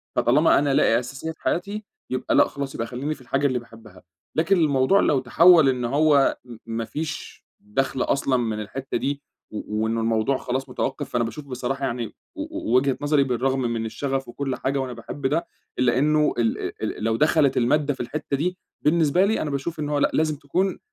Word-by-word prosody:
فطالما 150 +7 +4
أنا 140 -1 +1
لاقي 115 - +4
أساسيات 135 +6 -6
حياتي، 200 +5 -2 0.3
يبقى 130 - -1
لأ، - - +6
خلاص 140 -1 -5
يبقى 115 - -3
خلّيني 135 +5 -3
في 145 - -18
الحاجة 135 +3 0
اللي 130 -2 0
باحبها. 110 -5 -15 0.3
لكن 170 +5 +3
الموضوع 145 +2 +3
لو 145 - +3
تحوّل 160 +4 +6
إن 125 -2 -1
هو 140 +2 +3
م 120 -2 -10
ما 115 0 -3
فيش 155 +6 -6
دَخْل 130 +5 -2
أصلًا 135 -1 +1
من 110 -3 -1
الحتّة 130 +6 -4
دي 140 0 -2 0.3
و 105 0 -3
وإنه 115 +1 0
الموضوع 115 +3 +1
خلاص 130 +2 -3
متوقّف، 135 +3 -3
فأنا 120 -1 0
باشوف 140 +6 -6
بصراحة 135 +1 -3
يعني 120 -2 -2 0.3
و - - -5 0.2
و 115 - -2
وجهة 130 +1 +3
نظري 145 -1 +3
بالرغم 130 +1 0
من 115 -2 -1
الشغف 135 +4 -3
وكل 135 +2 -3
حاجة 140 +1 -1
وأنا 130 -2 -3
باحب 120 +4 -4
ده، 165 +5 -1 0.3
إلّا 125 -1 +3
إنه 150 +2 +3
الأ 115 -2 0 0.2
ال - - -3
ال - - -7
لو 110 0 +1
دخلت 150 0 +3
المادة 145 +4 +2
في - - -15
الحتّة 140 +3 -3
دي، 180 +5 -1 0.2
بالنسبة 165 +3 +3
لي 220 +2 +1
أنا 155 - -2
باشوف 145 +4 -3
إنه 150 -1 -2
هو - - +2
لأ، - - +2
لازم 155 -1 +1
تكون 170 +7 -1
135 Hz, 200 wpm, -24 LUFS, 120-150 Hz, 0.3 s, لأ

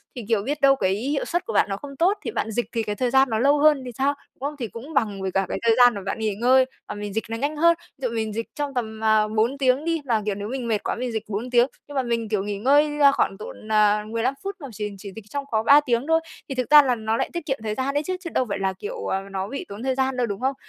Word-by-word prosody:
Thì, 245 - -5
kiểu, 225 -3 +2
biết 290 +5 -3
đâu 275 0 +6
cái 190 -7 +1
hiệu 275 +7 -2
suất 345 - -2
của 460 - -4
bạn - - +3
nó 195 - -2
không 275 +4 -9
tốt 365 +8 +2
thì - - -3
bạn 225 - -2
dịch 240 +2 -1
thì 230 -2 -1
cái 210 -1 -3
thời 250 +4 0
gian 265 0 +4
nó 220 -1 0
lâu 285 +4 +4
hơn 300 -2 +5
thì 250 - -5
sao, 275 +2 +2 0.2
đúng - - -38
không? 300 - -11
Thì 240 - -2
cũng 240 +9 -10
bằng 205 -7 0
với 190 0 -2
cả 195 +1 +1
cái - - -2
thời 230 -1 +5
gian 245 -1 +7
mà 200 - -5
bạn 195 - -3
nghỉ 215 -2 -1
ngơi 255 +4 +4 0.2
và - - -5
mình 205 -1 -6
dịch 225 - -1
nó 225 - -3
nhanh 290 +5 -2
hơn. 335 +2 +5 0.2
Ví 265 -2 -2
dụ 230 - -5
mình 220 -1 -2
dịch 230 +2 -3
trong 290 -1 -3
tầm, 220 -3 -4
à, 215 -1 +4
4 220 +5 0
tiếng 265 +2 +2
đi. 330 -1 0
Mà, 230 -4 +1
kiểu, 210 -2 -1
nếu 205 +1 -5
mình 250 0 -4
mệt 215 -3 0
quá - - -1
mình 250 +1 -3
dịch 220 -1 -3
4 215 +4 -4
tiếng, 240 0 +5 0.2
nhưng 290 - -10
mà 265 - +1
mình, 230 -2 -2
kiểu, 210 -3 0
nghỉ 205 0 -3
ngơi, 295 +6 +3
ơ, 280 -1 +7
khoảng 195 -7 0
độ 210 - -8
nà 210 -1 +2
15 230 +4 -1
phút 395 0 -4
mà 285 - -7
chỉ 210 -1 -4
chỉ 195 +1 -9
dịch 220 -2 -10
trong 280 +4 -4
có 220 -1 +1
3 285 +5 +7
tiếng 240 +2 0
thôi. 325 0 +4 0.3
Thì 270 - -3
thực 255 0 -2
ra 300 0 +10
là 255 -3 +1
nó 220 0 -1
lại - - -1
tiết 345 -3 -4
kiệm 270 -2 -2
thời 215 -1 -2
gian 265 +3 -1
đấy 290 +1 0
chứ, 370 +4 -2
chứ 355 -2 -7
đâu 255 - +1
phải 200 - -2
là, 190 0 0
kiểu, 455 - -6
ờ, 190 - -1
nó 190 0 -3
bị 275 +6 -5
tốn 200 +3 -8
thời 260 0 0
gian 265 0 0
đâu, 245 -1 +1
đúng 200 +1 -5
không? 265 +1 0
240 Hz, 320 wpm, -24 LUFS, 215-275 Hz, 0.3 s, ra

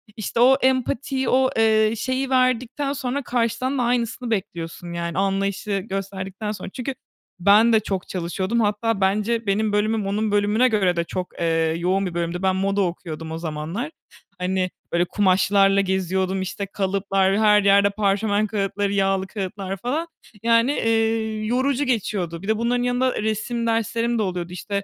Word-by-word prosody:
işte 220 +1 -3
o 255 +3 +7
empatiyi 260 0 0
o, 260 0 +3
eee, 220 -1 +4
şeyi 260 +3 -1
verdikten 255 +2 +1
sonra 275 0 -2
karşıdan 245 +3 -1
da 250 - +1
aynısını 240 0 -1
bekliyorsun, 175 -4 -4
yani, 170 -1 -3
anlayışı 195 +1 0
gösterdikten 195 +2 -5
sonra 210 - -6
çünkü 260 +1 -4 0.4
ben 210 +5 +5
de 220 - +6
çok 195 -3 -4
çalışıyordum. 185 +5 -2
Hatta 210 0 0
bence 215 +4 +1
benim 210 +2 +1
bölümüm 210 0 +1
onun 210 +2 -1
bölümüne 205 +4 +3
göre 200 -6 +2
de 170 - 0
çok, 180 +1 -4
eee, 165 -1 +1
yoğun 185 +3 0
bir 180 - -4
bölümdü. 170 +1 -2
Ben 190 -1 +2
moda 195 +1 0
okuyordum 165 -3 -4
o 160 - -4
zamanlar. 165 - -4 0.5
Hani, 185 0 0 0.2
böyle, 170 +1 +2
kumaşlarla 195 +1 +3
geziyordum, 190 0 -1
işte, 195 +2 -4
kalıplar, 195 0 0
her 210 -1 +5
yerde 200 0 +5
parşömen 205 +1 +1
kâğıtları, 200 -1 -1
yağlı 195 -1 +1
kâğıtlar 195 -1 -5
falan, 275 - -2 0.4
yani, 230 +3 +4
eee, 225 -2 0
yorucu 260 +4 +1
geçiyordu. 190 -9 -2
Bir 195 - -8
de 220 0 +2
bunların 240 +2 0
yanında 250 0 0
resim 225 +2 -2
derslerim 230 +1 0
de - - +2
oluyordu, 180 -2 -4
işte, 200 +2 -3
205 Hz, 155 wpm, -23 LUFS, 190-230 Hz, 0.5 s, o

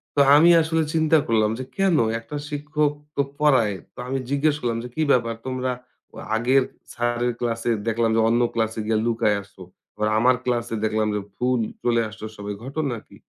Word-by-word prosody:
তো - - +1 0.2
আমি 165 +3 +7
আসলে 160 0 +1
চিন্তা 160 0 +4
করলাম 110 -2 +2
যে - - -3
কেন? 195 -3 +3 0.2
একটা 145 +6 -7
শিক্ষক 150 0 0 0.2
তো - - +2 0.2
পড়ায়। 130 -9 +3 0.2
তো - - -48
আমি 135 +1 -1
জিজ্ঞেস 145 +2 +2
করলাম 115 -2 -1
যে, 125 - -7
"কি 160 - -1
ব্যাপার 115 -2 +2
তোমরা 130 0 -2 0.4
তো - - -20 0.2
আগের 125 +4 +3 0.3
স্যারের 120 0 0
ক্লাসে 115 -1 -2 0.2
দেখলাম 115 0 +1
যে 115 - +3
অন্য 120 +1 +2
ক্লাসে 110 -1 -1
গিয়া 110 -1 +2
লুকায়া 110 -3 +1
আছো। 100 -1 -19 0.3
আবার 105 0 0
আমার 125 +2 +4
ক্লাসে 120 -2 -1
দেখলাম 110 0 +1
যে - - 0 0.2
ফুল 125 -1 +1 0.2
চলে 120 -1 +2
আসছো 110 +1 -9
সবাই, 100 0 -5
ঘটনা 140 -2 -2
কী?" - - -16
120 Hz, 185 wpm, -23 LUFS, 115-140 Hz, 0.4 s, আমি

